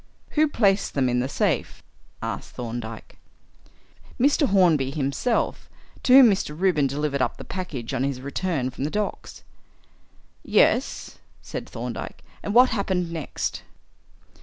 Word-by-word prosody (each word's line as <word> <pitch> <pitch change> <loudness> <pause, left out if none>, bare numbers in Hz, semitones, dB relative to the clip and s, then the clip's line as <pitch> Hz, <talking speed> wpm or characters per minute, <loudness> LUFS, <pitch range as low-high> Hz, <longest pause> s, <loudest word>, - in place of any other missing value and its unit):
"Who 310 0 +3
placed 205 -8 +1
them 135 -2 +2
in 125 0 +1
the 130 +2 -1
safe?" - - -1 0.4
asked - - -5
Thorndyke. 115 -2 -7 1.0
"Mr. 285 +3 +3
Hornby 170 - +3
himself, 145 - -1 0.3
to 255 - +3
whom 265 0 +10
Mr. 185 -7 -1
Reuben 175 -7 +3
delivered 140 0 -2
up - - 0
the - - -8
package 150 -11 -5
on 125 - 0
his 135 -2 -2
return 140 0 -2
from 130 - -6
the 145 - 0
docks." 210 +4 -4 1.0
"Yes," - - +1 0.2
said - - -6
Thorndyke, - - -6 0.2
"and 205 - -4
what 250 +1 +7
happened 190 -5 -1
next?" 160 -4 -4
155 Hz, 135 wpm, -24 LUFS, 135-200 Hz, 1.0 s, whom